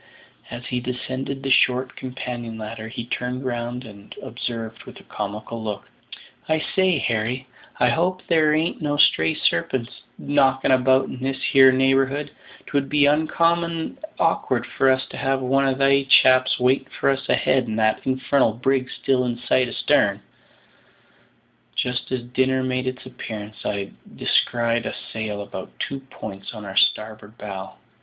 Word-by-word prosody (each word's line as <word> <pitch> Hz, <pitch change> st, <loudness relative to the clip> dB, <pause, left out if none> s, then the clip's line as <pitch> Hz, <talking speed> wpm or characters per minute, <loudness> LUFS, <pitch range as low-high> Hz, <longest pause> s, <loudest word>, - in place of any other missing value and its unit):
As 120 Hz, +1 st, -7 dB
he 125 Hz, 0 st, -2 dB
descended 130 Hz, +2 st, -4 dB
the 135 Hz, -, -1 dB
short 130 Hz, 0 st, +3 dB
companion 125 Hz, -3 st, -6 dB
ladder 110 Hz, 0 st, -6 dB
he 115 Hz, +1 st, -6 dB
turned 125 Hz, +2 st, -3 dB
round 120 Hz, 0 st, -3 dB
and 100 Hz, -2 st, -12 dB
observed 115 Hz, -1 st, -6 dB
with -, -, -11 dB
a -, -, -16 dB
comical 105 Hz, +2 st, -5 dB
look, 105 Hz, -2 st, -5 dB, 0.6 s
"I 155 Hz, -, +3 dB
say, 185 Hz, +2 st, +1 dB
Harry, 120 Hz, +1 st, -1 dB, 0.3 s
I 125 Hz, -, +4 dB
hope 180 Hz, +8 st, 0 dB
there 155 Hz, -2 st, +3 dB
ain't 160 Hz, +2 st, -1 dB
no 145 Hz, -1 st, -1 dB
stray 80 Hz, -, +4 dB
sarpents 115 Hz, +8 st, -1 dB, 0.2 s
knocking 135 Hz, -2 st, +2 dB
about 130 Hz, +1 st, +4 dB
in 130 Hz, -, -8 dB
this 135 Hz, +1 st, -2 dB
here 130 Hz, -1 st, +8 dB
neighbourhood; 135 Hz, +2 st, +2 dB, 0.3 s
'twould 140 Hz, -1 st, -1 dB
be 145 Hz, -1 st, +4 dB
uncommon 165 Hz, -, +1 dB, 0.2 s
awk'ard -, -, +1 dB
for 135 Hz, -, +2 dB
us 130 Hz, 0 st, +2 dB
to -, -, -8 dB
have 135 Hz, 0 st, 0 dB
one 135 Hz, +1 st, +2 dB
of 130 Hz, -1 st, 0 dB
they 140 Hz, 0 st, +3 dB
chaps 130 Hz, -1 st, +5 dB
waiting 130 Hz, +2 st, +2 dB
for -, -, +3 dB
us 135 Hz, 0 st, -4 dB
ahead 130 Hz, -2 st, +2 dB
and 110 Hz, 0 st, -3 dB
that 110 Hz, -1 st, +1 dB
infarnal 130 Hz, -2 st, +2 dB
brig 130 Hz, 0 st, +1 dB
still 130 Hz, -1 st, 0 dB
in 120 Hz, -1 st, -2 dB
sight 125 Hz, +1 st, +1 dB
astarn." 120 Hz, -, +2 dB, 1.6 s
Just 125 Hz, +1 st, -2 dB
as 130 Hz, -2 st, -2 dB
dinner 130 Hz, +1 st, +1 dB
made 130 Hz, 0 st, -1 dB
its 130 Hz, 0 st, -4 dB
appearance 110 Hz, -2 st, -8 dB
I 100 Hz, -1 st, -3 dB, 0.2 s
descried 115 Hz, -1 st, +1 dB
a -, -, -4 dB, 0.2 s
sail 105 Hz, -2 st, -3 dB
about -, -, -9 dB
two 135 Hz, -, -3 dB
points 100 Hz, +1 st, -8 dB
on 105 Hz, -1 st, -8 dB
our 95 Hz, -1 st, -7 dB
starboard 110 Hz, 0 st, 0 dB
bow. 95 Hz, -2 st, -7 dB
130 Hz, 155 wpm, -23 LUFS, 115-135 Hz, 1.6 s, here